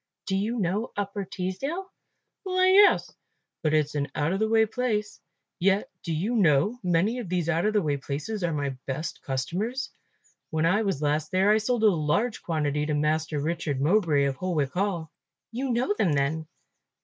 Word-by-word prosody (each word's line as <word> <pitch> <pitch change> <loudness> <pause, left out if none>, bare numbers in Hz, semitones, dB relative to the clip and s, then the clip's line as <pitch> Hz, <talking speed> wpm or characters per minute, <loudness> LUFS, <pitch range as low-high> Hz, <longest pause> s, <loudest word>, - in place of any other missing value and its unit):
"Do 190 - -1
you 215 +5 -1
know 205 +3 -1
Upper 200 0 -2
Teesdale?" 205 - -4 0.5
"Why, 370 -1 +2
yes, 405 +2 +5 0.5
but 155 -1 +1
it's 150 -1 +1
an 145 -1 -1
out 150 +5 0
of 195 - -1
the 220 0 +1
way 220 0 +4
place. 215 -2 -2 0.4
Yet, 195 +3 +2
do 170 - -4
you 180 +9 -1
know, 185 - +3
many 185 +6 +1
of 220 -8 -6
these 175 -3 -1
out 170 +4 +2
of 215 - 0
the 210 -3 +2
way 145 -2 0
places 150 +9 -4
are 170 - +1
my 145 -2 -1 0.2
best 140 +5 -4
customers. 180 - -3 0.6
When 160 0 0
I 195 +6 +3
was 195 -9 -1
last 150 +1 0
there 190 +2 +3
I 215 - +4
sold 230 +1 0
a - - +7
large 195 +6 +1
quantity 150 -3 -1
to 150 - 0
Master 155 0 0
Richard 155 -2 -2
Mowbray 155 -2 +3
of 135 -1 -1
Holwick 155 -6 -1
Hall." 180 -5 -1 0.4
"You 260 +4 -3
know 250 - +1
them 175 - +2
then?" 150 +3 0
180 Hz, 185 wpm, -26 LUFS, 150-215 Hz, 0.6 s, a